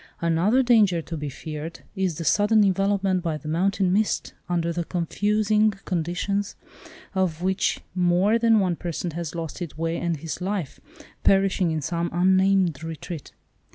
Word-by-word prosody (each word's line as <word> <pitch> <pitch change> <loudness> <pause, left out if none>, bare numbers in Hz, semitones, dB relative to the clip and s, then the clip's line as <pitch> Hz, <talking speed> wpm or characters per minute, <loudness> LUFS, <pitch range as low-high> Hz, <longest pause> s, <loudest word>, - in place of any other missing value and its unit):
Another 175 +10 +2
danger 215 -8 +4
to 165 - -6
be 150 -2 -4
feared, 155 +3 -7
is 190 -4 0
the 170 - -4
sudden 210 +5 +4
envelopment 195 -1 +1
by 165 -3 -2
the 150 - -10
mountain 185 +3 +1
mist, 210 +2 0 0.2
under 170 -1 0
the 170 0 -2
confusing 210 +5 +1
conditions 185 +3 -2 0.6
of 180 -3 -1
which 190 +1 0
more 180 +5 +3
than 225 -1 +4
one 185 -3 +1
person 175 0 -4
has 170 0 -5
lost 165 0 -5
his 170 -5 -6
way 165 +1 -1
and 170 -2 -1
his 160 +4 -6
life, 185 -6 -3 0.4
perishing 195 -2 +3
in 160 -1 -1
some 170 +3 -1
unnamed 185 -3 +2
retreat. 160 -1 -7
180 Hz, 155 wpm, -24 LUFS, 165-195 Hz, 0.6 s, danger